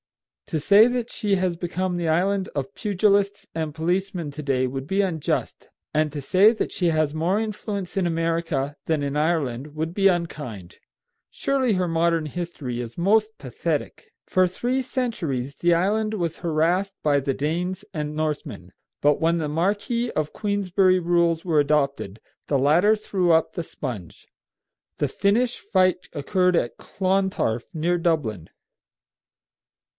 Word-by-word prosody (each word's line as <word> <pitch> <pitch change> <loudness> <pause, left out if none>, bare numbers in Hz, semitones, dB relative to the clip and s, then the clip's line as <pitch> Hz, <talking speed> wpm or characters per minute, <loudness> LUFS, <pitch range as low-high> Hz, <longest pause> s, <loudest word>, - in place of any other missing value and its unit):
To 160 - -1
say 205 +8 +6
that 245 -1 -2
she 205 -3 0
has 185 -2 0
become 180 +1 -2
the 170 -2 -1
island 190 +4 +1
of 135 -2 -3
pugilists 200 -1 +1
and 160 -2 -2
policemen 175 0 -1
to 150 +2 -7
day 130 -2 +1
would 135 +1 -5
be 195 +7 -1
unjust, 170 -6 -2 0.2
and 155 0 +1
to 145 -1 -5
say 190 +10 +5
that 230 - -3
she 180 - 0
has 155 -2 +1
more 170 +6 +1
influence 210 -3 -4
in 190 -2 +1
America 165 -4 -1
than 160 -2 0
in 140 0 -2
Ireland 150 -3 -1
would 160 +2 -3
be 195 +1 +4
unkind. 145 - -4 0.5
Surely 265 -4 0
her 185 -2 0
modern 165 -1 +1
history 150 -7 -4
is 120 -1 -8
most 215 +5 +2
pathetic. 145 +4 -4
For 185 0 +3
three 245 +8 -1
centuries 165 - -3
the 175 0 +2
island 215 +5 +1
was 170 -5 -2
harassed 175 +5 +1
by 145 -2 +3
the 135 -1 -1
Danes 180 +6 -2
and 150 -1 -3
Northmen; 150 - -4 0.3
but 145 +2 +3
when 165 +1 +3
the 160 -2 -1
Marquis 205 +9 0
of 155 -1 -1
Queensberry 195 -3 +2
rules 170 -1 +1
were 160 -4 +3
adopted, 140 -8 0 0.3
the 140 - +2
latter 170 +10 +4
threw 190 -4 0
up 160 0 +3
the 170 - -3
sponge. 120 - -7 0.7
The - - +1
finish 230 +5 +1
fight 185 -2 +1
occurred 180 +4 +1
at 120 - -1
Clontarf, 190 - -1
near 170 +2 +1
Dublin. 135 - -1
170 Hz, 150 wpm, -24 LUFS, 150-195 Hz, 0.7 s, say